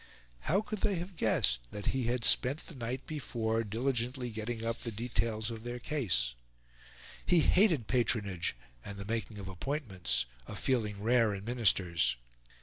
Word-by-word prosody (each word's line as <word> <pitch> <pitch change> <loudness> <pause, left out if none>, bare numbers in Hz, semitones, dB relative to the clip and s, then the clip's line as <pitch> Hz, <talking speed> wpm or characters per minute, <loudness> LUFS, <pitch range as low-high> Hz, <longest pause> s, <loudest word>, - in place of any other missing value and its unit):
How 195 +4 +4
could 215 -1 -5
they 200 - +2
have 175 +2 -5
guessed 60 - +2
that 105 +7 -6
he 130 -2 0
had 120 0 0
spent 135 +5 +4
the - - -9
night 125 0 -4
before 115 -7 -1
diligently 120 +2 -1
getting 110 +1 -4
up 115 0 -2
the 120 - -4
details 115 0 -1
of 115 -1 -7
their 120 0 -4
case? 105 - 0 0.9
He 175 -2 +5
hated 170 - +4
patronage 105 - +1 0.3
and 100 - -7
the 100 - -6
making 110 0 -3
of 100 -2 -6
appointments 95 - -2 0.2
a - - -6
feeling 105 -6 0
rare 115 -2 +4
in 100 +1 -7
Ministers. 90 - +2
115 Hz, 155 wpm, -32 LUFS, 100-130 Hz, 0.9 s, He